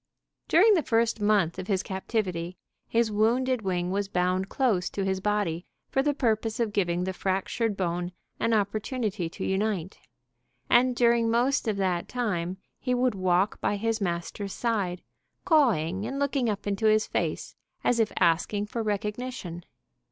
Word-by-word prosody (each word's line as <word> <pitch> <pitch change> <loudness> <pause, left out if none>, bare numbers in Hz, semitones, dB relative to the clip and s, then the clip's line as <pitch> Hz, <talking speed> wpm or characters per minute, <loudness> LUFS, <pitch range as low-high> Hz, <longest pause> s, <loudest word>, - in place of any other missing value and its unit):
During 420 +7 +6
the 350 - +3
first 230 -4 +1
month 205 -5 +2
of 185 - -5
his 195 -2 0
captivity, 185 -3 -3 0.3
his 230 -1 +1
wounded 240 +4 +2
wing 180 -2 -1
was 200 +1 -1
bound 185 0 0
close 225 -10 +1
to 195 - -3
his 190 0 0
body 190 -4 -1 0.3
for 270 - +2
the 290 0 +1
purpose 225 -4 0
of 225 -3 0
giving 175 -3 +1
the 190 +1 -2
fractured 195 +4 -1
bone 175 -1 -2 0.3
an 230 - +1
opportunity 215 -2 -1
to - - -6
unite, 190 -2 -1 0.7
and 250 +1 +5
during 235 -1 +3
most 245 +3 +2
of 210 -2 0
that 185 -3 0
time 190 -7 -2 0.2
he 250 -2 0
would 250 -1 +2
walk 185 +1 +1
by - - +1
his 225 +1 -1
master's 190 +2 -3
side, 200 -7 -1 0.4
cawing 215 - +2
and 270 +3 -4
looking 275 -4 0
up 205 -2 -3
into 205 +2 0
his 215 0 +4
face - - -3 0.3
as 240 - +2
if 220 -2 +2
asking 175 +5 +2
for 230 +2 -4
recognition. 210 -3 -3
210 Hz, 160 wpm, -27 LUFS, 185-235 Hz, 0.7 s, During